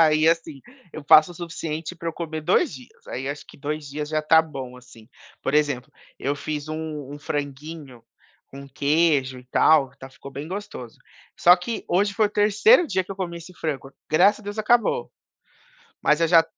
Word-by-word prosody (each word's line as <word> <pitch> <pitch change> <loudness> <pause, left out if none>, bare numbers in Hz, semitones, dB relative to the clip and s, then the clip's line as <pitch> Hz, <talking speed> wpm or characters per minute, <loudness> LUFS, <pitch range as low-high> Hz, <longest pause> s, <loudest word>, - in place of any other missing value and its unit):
Aí, 155 0 +5
assim, 165 -4 0 0.3
eu 155 - -8
faço 155 +3 +7
o - - -15
suficiente 165 -1 -5
pra 170 - -4
eu 165 - -3
comer 160 -2 -5
2 175 +5 +2
dias, 130 -4 -14
aí 135 +2 -4
acho 145 0 -5
que - - -15
2 150 +1 -4
dias 150 +1 -5
já 155 0 -1
tá 160 +1 +6
bom, 135 -5 -8
assim. 120 -3 -16 0.3
Por - - -1
exemplo, 145 -4 +1 0.3
eu 140 +2 -2
fiz 150 +1 -5
um 155 -3 -5
um 145 - -9
franguinho 145 -3 -6 0.4
com 140 0 -11
queijo 140 -2 +1
e - - -19
tal, 140 0 +4
ta 135 - -10
ficou 140 +1 -12
bem 140 +3 -7
gostoso, 185 - -7 0.4
só 175 +1 +7
que 220 +6 -5
hoje 200 +3 +1
foi 215 0 +3
o - - -7
3º 215 - +5
dia 190 -8 0
que 185 - -15
eu 195 - -5
comi 175 -3 -4
esse 170 +2 -12
frango, 140 -5 -4 0.2
graças 200 +8 +4
a - - -16
Deus, 205 +1 -7
acabou. 240 - +2 0.9
Mas 150 +2 +3
eu 165 - +4
já 165 -1 +6
155 Hz, 195 wpm, -24 LUFS, 140-175 Hz, 0.9 s, faço